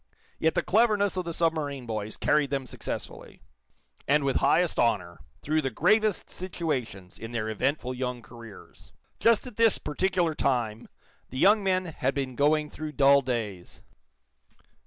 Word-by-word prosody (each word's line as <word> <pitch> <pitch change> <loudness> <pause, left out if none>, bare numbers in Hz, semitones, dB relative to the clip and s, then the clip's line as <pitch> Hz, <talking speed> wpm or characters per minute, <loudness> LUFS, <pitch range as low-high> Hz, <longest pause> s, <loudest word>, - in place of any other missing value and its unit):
Yet 160 - +1
the - - +1
cleverness 210 -2 +2
of 185 -1 -2
the 170 - -3
submarine 155 -6 -1
boys 110 -2 -4
carried 150 -2 +2
them 135 -2 -2
successfully, - - -7 0.7
and 145 +1 +3
with 135 -1 +1
highest 160 +5 +2
honor, 90 -8 0 0.2
through 155 +1 +1
the 135 - -1
gravest 215 - +2
situations 130 - -4
in 115 +1 -8
their 110 -2 -2
eventful, 130 +4 -1
young 125 -1 -4
careers. 115 -3 -14 0.3
Just 230 +1 +3
at 245 -4 -10
this 230 -2 +4
particular 175 +1 0
time 120 -6 -1 0.4
the 130 - -7
young 205 +8 +5
men 185 -1 +1
had 140 -5 -2
been 135 -3 -3
going 150 +2 +2
through 155 0 -7
dull 140 +1 +5
days. 110 -8 -5
140 Hz, 150 wpm, -27 LUFS, 120-175 Hz, 0.7 s, young